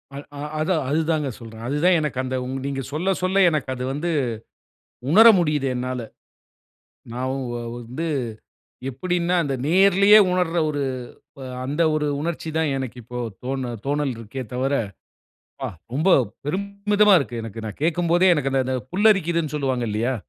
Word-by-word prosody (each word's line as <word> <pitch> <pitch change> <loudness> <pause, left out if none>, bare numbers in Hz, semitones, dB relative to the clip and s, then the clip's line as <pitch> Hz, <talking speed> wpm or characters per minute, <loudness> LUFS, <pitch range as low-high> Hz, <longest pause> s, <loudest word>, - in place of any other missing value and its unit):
அல், 140 - -7
ஆ. - - -7 0.2
அதான், 155 -1 +1
அதுதாங்க 155 -1 0
சொல்றேன். 115 -1 -10
அது 140 +3 -1
தான், 180 -1 +5
எனக்கு 150 -4 -3
அந்த 130 0 -3 0.3
நீங்க 140 -1 -2
சொல்ல 180 +6 +1
சொல்ல 190 +1 +3
எனக்கு 150 -4 -2
அது 125 - -5
வந்து, 165 +5 -2 1.0
உணர 225 +6 +8
முடியுது 150 -5 +1
என்னால. 125 0 -3 1.1
நான் 130 +2 -2
வ் - - -3
வ 120 - -3 0.2
வந்து 125 +8 -5 0.8
எப்படினா, 175 +6 -1
அந்த 140 -2 -1
நேரிலேயே 195 +4 +6
உணர்ற 180 -2 0
ஒரு, 145 -1 -2 0.8
அந்த 145 +5 0
ஒரு 150 -1 0
உணர்ச்சி 165 +1 -3
தான், 160 -2 +1
எனக்கு 130 -2 -5
இப்போ 125 +2 -7 0.3
தோ 130 - -2 0.3
தோணல் 145 -2 0
இருக்கே 115 +4 -6
தவர. 135 +3 0 0.9
ப, - - -1 0.3
ரொம்ப 155 +7 +1 0.4
பெருமிதமா 200 +4 +2
இருக்கு 120 -6 -4
எனக்கு. 115 0 -7
நான் 105 - -8
கேட்கும்போதே 175 +2 +3
எனக்கு, 135 -3 -1
அந்த, 135 -1 +2
அந்த 130 0 -1 0.2
புல்லரிக்கிதுனு 175 -6 +2
சொல்வாங்க 130 -4 -1
இல்லையா. 115 +5 0
150 Hz, 150 wpm, -23 LUFS, 130-175 Hz, 1.1 s, உணர